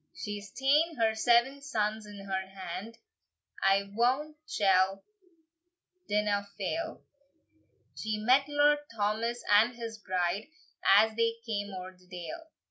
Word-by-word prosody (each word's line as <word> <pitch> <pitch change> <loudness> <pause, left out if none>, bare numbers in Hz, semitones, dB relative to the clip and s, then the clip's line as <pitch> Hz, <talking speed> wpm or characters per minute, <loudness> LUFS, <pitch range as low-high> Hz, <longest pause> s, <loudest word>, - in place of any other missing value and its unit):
She's 205 -1 -6
taen 290 +7 +2
her 225 -1 +2
seven 240 +5 +3
sons 215 -6 -2
in 200 -1 -10
her 190 -1 -2
hand, 195 +4 -7 0.6
I 195 +1 +3
wot 260 +7 +1
she 205 - 0 1.4
didna 205 -1 +1
fail; 325 - -3 0.9
She 215 +9 -2
met 255 +6 +3
Lord 290 0 +4 0.2
Thomas 225 +3 -1
and 220 +4 +5
his 230 -2 -7
bride, 185 +1 -1 0.4
As 215 +3 +5
they 230 0 +1
came 205 -3 -3
oer 185 0 -8
the 180 0 -24
dale. 185 - -8
215 Hz, 125 wpm, -30 LUFS, 200-245 Hz, 1.4 s, and